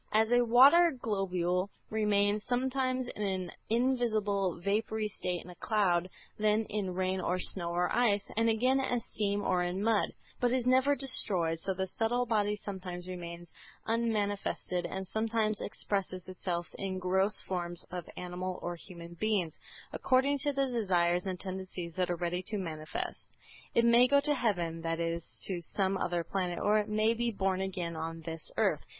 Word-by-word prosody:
As 220 +2 +3
a 245 0 +6
water 275 +9 +7
globule 185 -4 0 0.2
remains 210 -1 +2
sometimes 255 0 0
in - - -7
an 190 -3 -1 0.2
invisible 215 -7 +1
vapory 215 +3 0
state 180 -3 -3
in 180 - -10
a - - -12
cloud, 185 -4 +1 0.3
then 215 +1 +3
in 195 -4 -2
rain 185 0 0
or 180 +1 0
snow 175 -1 0
or 175 +1 0
ice, 210 -5 +2
and 225 +1 +3
again 255 +4 +3
as 245 -3 -1
steam 205 -1 0
or 180 -1 +2
in 180 +3 -1
mud, 220 -2 +2 0.3
but 245 0 +2
is 255 -2 +1
never 260 +3 +4
destroyed, 190 -11 0
so 190 +2 -1
the 190 +1 -1
subtle 230 +6 0
body 210 -3 +1
sometimes 185 -3 -6
remains 175 -2 -7 0.3
unmanifested 205 -5 -1
and 190 +2 -4
sometimes 220 0 0
expresses 190 -3 -3
itself 180 -2 -3
in 190 -1 -2
gross 190 +3 +2
forms 175 -2 -4
of 180 -2 -5
animal 180 +1 -4
or 175 0 -2
human 170 -1 -10
beings, 180 -4 -1 0.3
according 270 +2 +2
to 290 +2 0
the 275 -1 +1
desires 180 -7 +1
and 185 -2 -3
tendencies 185 -2 -5
that 180 -1 0
are 175 - +1
ready 175 +1 -2
to 210 +3 -3
manifest. 155 -4 -5 0.5
It 235 - +5
may 235 +1 +7
go 280 +2 +5
to 295 +1 +2
heaven, 175 - 0
that 165 0 -2
is, 170 0 -1 0.2
to 180 -3 -2
some 190 +3 0
other 175 -2 -1
planet, 180 -1 -2
or 210 +1 +3
it 210 0 -2
may 215 +1 +3
be 235 +1 0
born 195 -3 0
again 180 -3 -3
on 165 +1 -4
this 165 -1 -6
earth. - - +2
195 Hz, 170 wpm, -31 LUFS, 180-225 Hz, 0.5 s, water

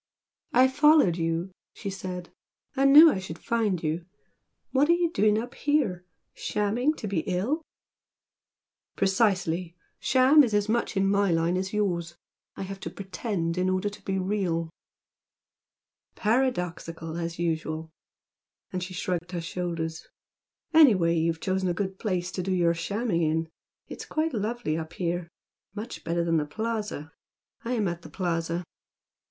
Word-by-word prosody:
"I 255 +2 +6
followed 290 - +5
you" 165 +2 -1 0.2
she 200 - -5
said 180 -2 -6 0.4
"I 270 0 +2
knew 300 +4 +9
I 190 - -2
should 180 -3 -7
find 215 -7 0
you! 160 +2 -1 0.7
What 280 +3 +3
are - - +7
you 345 -1 +1
doing 210 -6 +3
up 240 +3 -4
here? 235 -13 0 0.3
Shamming 235 +9 0
to 215 - -5
be 195 -4 0
ill?" 205 - 0 1.3
"Precisely! 185 -4 +1 0.2
'Sham' 270 +3 +6
is 225 -5 0
as 205 0 +2
much 225 -2 0
in 195 0 +3
my 200 0 +3
line 165 +1 +2
as 190 +1 -2
yours. 175 -5 -1 0.4
I - - -5
have 195 +1 -6
to - - -5
'pretend' 190 -3 -3
in 185 +1 +2
order 185 +2 0
to 205 - -12
be 190 0 -1
real!" 185 -4 -1 1.4
"Paradoxical 180 -9 -1
as 170 0 -4
usual!" 160 -1 -2 0.8
and 185 - -2
she 185 0 -6
shrugged 180 0 -3
her 175 - -1
shoulders 165 -1 -4 0.7
"Anyway 205 - +6
you've 165 0 0
chosen 185 0 0
a 175 - -1
good 190 0 -3
place 180 -4 -1
to 185 - -3
do 190 +2 -2
your 175 -2 +3
shamming 200 +2 -1
in. 160 0 0 0.4
It's - - -8
quite 310 0 -1
lovely 220 -5 -1
up 160 0 -7
here, 175 -1 -2 0.5
much 220 +3 -6
better 170 +1 0
than 165 -1 +2
the 150 -1 -1
Plaza. 210 -5 -4 0.5
I 240 - -2
am 215 -5 +1
at 170 0 -4
the - - -11
Plaza." 170 -1 -2
185 Hz, 150 wpm, -27 LUFS, 170-220 Hz, 1.4 s, knew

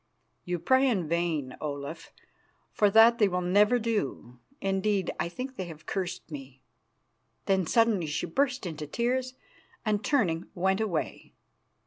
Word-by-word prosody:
"You 180 0 -1
pray 260 +11 +3
in 190 -9 0
vain, 160 -5 -1
Olaf, 145 +1 -5 0.6
for 210 - +3
that 225 +3 +6
they 210 - +5
will 180 -1 -1
never 205 +6 +4
do. 205 - -3 0.2
Indeed, 195 -1 0
I - - -1
think 255 +10 -5
that 260 - -29
they 185 - -3
have 155 -2 -11
cursed 180 -3 -4
me." 135 -2 -9 0.8
Then 190 -3 +1
suddenly 225 -7 +3
she 150 0 -2
burst 270 +3 0
into 155 -3 -5
tears, 255 - -1 0.5
and, 210 -1 0
turning, 180 - +1
went 190 +3 +1
away. 190 -8 -3
190 Hz, 145 wpm, -28 LUFS, 160-225 Hz, 0.8 s, that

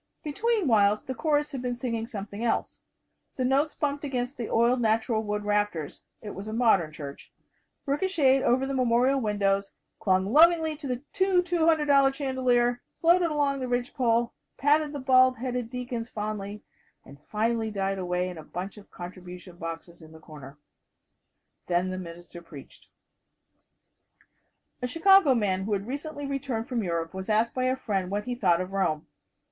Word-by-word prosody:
Between 415 +5 0
whiles 210 -3 +3
the 260 - -4
chorus 295 +2 0
had 270 -3 -5
been 250 -1 -2
singing 230 -2 -3
something 205 -1 -6
else. 235 - -1 0.5
The 255 - -1
notes 275 +4 +1
bumped 290 -1 -2
against 255 -1 -3
the 235 -3 -5
oiled 240 +2 +3
natural 220 0 +1
wood 210 -1 -3
rafters 205 -7 -1 0.2
it 210 - -6
was 195 +3 -8
a 215 - -5
modern 220 -9 +3
church 145 -2 -9 0.5
ricochetted 280 -3 +2
over 255 +2 +2
the 275 - -3
memorial 255 +1 +2
windows, 200 -2 0 0.3
clung 190 +2 +1
lovingly 320 0 +5
to 290 -2 -7
the 250 +1 -3 0.2
new 375 -1 +4
$200 310 -5 +3
chandelier, 250 -3 +1 0.2
floated 340 +1 +4
along 285 -2 0
the 255 - -3
ridgepole, 245 -1 0 0.2
patted 295 +2 +2
the 290 - -5
bald 255 -1 +4
headed 245 -1 -3
deacons 245 -2 -5
fondly, 210 -1 -5 0.4
and 140 +1 -14
finally 220 +5 -1
died 195 -2 -2
away 180 0 -1
in 180 -3 -7
a - - -9
bunch 185 +6 -6
of 205 - -14
contribution 180 0 -10
boxes 165 +1 -7
in 160 0 -14
the 160 - -13
corner. 145 -3 -12 1.1
Then 180 +1 +1
the 185 - -4
minister 175 0 -10
preached. 150 -5 -13 1.9
A 250 - -1
Chicago 330 0 +5
man 190 -4 0
who 210 - -1
has 195 -1 -1
recently 290 +4 -5
returned 275 -5 -3
from 245 -3 -1
Europe 170 -3 -2
was 190 +2 -6
asked 220 +2 +2
by 255 0 -1
a 255 0 +2
friend 200 -8 -2
what 205 +2 -2
he 250 - -3
thought 185 -7 +2
of 185 +1 -5
Rome. 175 -6 0
235 Hz, 165 wpm, -27 LUFS, 195-270 Hz, 1.9 s, lovingly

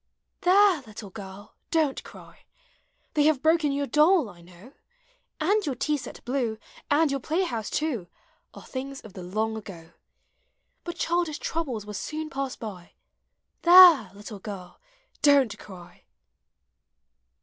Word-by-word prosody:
There! 375 -2 +5
little 210 -2 -10
girl, 200 +1 -10 0.2
don't 310 -5 0
cry! - - -15 0.7
They 295 -1 +3
have 300 -4 +2
broken 320 -2 +3
your 280 0 -1
doll, 305 - +3
I 175 - -17
know; 180 +9 -16 0.7
And 405 +7 +2
your 285 -7 -2
tea 300 +4 0
set 285 - -8
blue, 240 -3 -1 0.3
And 295 0 +3
your 275 - -1
play 320 +8 -1
house, 230 - -3
too, 265 - -2 0.5
Are - - -11
things 270 +1 -6
of 215 - -13
the 185 - -8
long 215 +5 -2
ago; 175 -6 -10 1.0
Hut 345 - -4
childish 340 -3 -1
troubles 265 -13 -3
will 210 - -8
soon 310 +8 -5
pass 270 -1 -3
by 190 -6 -9 0.7
There! 345 - +8
little 205 0 -9
girl, 190 - -9 0.4
don't 275 -7 +4
cry! 180 -3 -13
270 Hz, 140 wpm, -26 LUFS, 210-315 Hz, 1.0 s, There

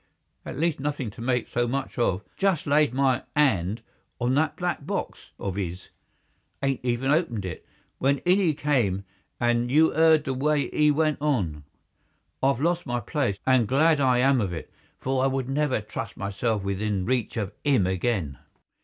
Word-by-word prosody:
At - - -6
least 165 -1 0
nothing 140 -5 -3
to 110 - -11
make 125 0 0
so 120 0 0
much 135 +1 -3
of. 100 -4 +1
Just 195 -5 +1
laid 145 -1 +3
my 130 -1 +2
'and 110 -7 +2 0.4
on 120 +1 +1
that 155 +2 +1
black 175 -4 -2
box - - -4
of 100 0 -3
'is—'adn't 95 +8 -6
even 125 +2 0
opened 145 - 0
it, 90 -4 -6 0.4
when 140 +2 +2
in 180 +3 +4
'e 165 -6 +2
came 115 -11 0 0.3
and 120 0 +1
you 155 +4 +4
'eard 160 -1 +5
the 135 - -2
way 145 +2 0
'e 150 0 +4
went 155 0 +1
on. 90 - -1 0.8
I've 135 -2 +2
lost 170 +2 0
my 120 -1 -1
place, 120 -3 -1
and 130 -4 +4
glad 150 +5 +3
I 130 -2 +3
am 130 0 +3
of 95 -4 -2
it, 80 - -7 0.3
for 130 0 -1
I - - +4
would 135 -1 -1
never 135 -3 0
trust 105 - -6
myself 100 +2 -1
within 100 0 -1
reach 125 -1 -1
of 100 -3 -3
'im 135 -10 +3
again." 95 - -1
130 Hz, 170 wpm, -26 LUFS, 105-145 Hz, 0.8 s, eard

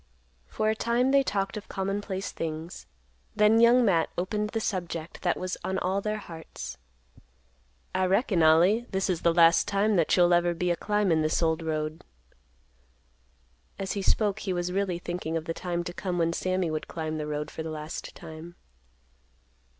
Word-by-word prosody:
For 215 - -1
a - - -1
time 240 +4 +1
they 275 0 +5
talked 200 -5 -2
of 210 - -9
commonplace 195 0 -3
things, 160 +1 -6 0.5
then 210 +2 +5
Young 240 +1 +6
Matt 170 -6 +2
opened 210 +4 -1
the 225 - -2
subject 170 -5 -4
that 175 - +1
was 185 0 -3
on 190 - -1
all 190 +2 0
their 215 +1 -2
hearts. 160 - -8 1.1
"I 185 0 +1
reckon, 195 -2 +2
Ollie, 175 +9 +5
this 190 0 0
is 170 - -2
the 170 - +4
last 165 0 +5
time 205 0 +2
that 165 +1 +3
you'll 175 0 +5
ever 175 0 +3
be 180 +1 0
a - - +2
climbin' 200 -5 +1
this 155 +2 +1
old 160 0 +1
road." 155 0 -3 1.7
As 195 -1 -3
he 200 - -2
spoke 205 +1 +1
he 190 - -2
was 175 0 -2
really 190 -2 0
thinking 175 -2 -3
of 160 - -5
the 165 - -2
time 175 0 -3
to 175 - -6
come 180 -1 -3
when 165 -1 +1
Sammy 185 -1 -1
would 155 - -3
climb 155 -1 -4
the 150 - -3
road 150 0 -3
for - - -6
the 160 - -4
last 155 0 -6
time. 160 +2 -10
180 Hz, 180 wpm, -27 LUFS, 165-200 Hz, 1.7 s, Young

